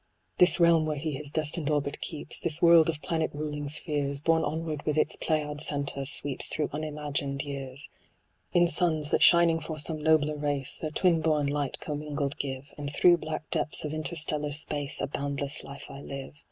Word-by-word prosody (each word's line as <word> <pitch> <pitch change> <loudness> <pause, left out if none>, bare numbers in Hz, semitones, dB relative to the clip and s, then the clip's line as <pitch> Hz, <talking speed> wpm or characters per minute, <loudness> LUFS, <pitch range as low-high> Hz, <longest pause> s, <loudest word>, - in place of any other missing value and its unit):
This 180 +1 +5
realm 165 -2 +5
where 155 - -1
he 155 +2 -2
his 145 +1 -5
destined 155 0 -2
orbit 145 -1 -1
keeps, 155 - -5
This 160 -1 0
world 170 -2 +7
of 155 -2 -4
planet 160 -1 0
ruling 150 -1 -4
spheres, 145 -2 -2
Borne 160 +2 +2
onward 155 0 -3
with 150 -1 -1
its - - +2
Pleiad 150 -2 -1
centre, 140 -2 -1
sweeps 140 -1 +2
Through 150 -2 -1
unimagined 145 -2 -3
years. 140 -1 -6 0.6
In 175 0 +5
suns, 155 -2 +1
that - - +2
shining 170 -1 +6
for 155 0 -6
some 155 +1 -1
nobler 150 -1 +3
race 145 -2 -2
Their 155 - -2
twin 165 +1 +2
born 155 -2 +2
light 145 -1 -2
commingled 145 -2 -3
give, 135 0 -5
And 145 -1 -4
through 175 +3 +5
black 155 -1 -5
depths 155 -1 -1
of 150 - -3
interstellar 155 -2 -2
space 145 -1 -1
A - - 0
boundless 140 0 -2
life 140 0 -9
I 140 0 -9
live. 140 0 -7
150 Hz, 180 wpm, -28 LUFS, 145-155 Hz, 0.6 s, world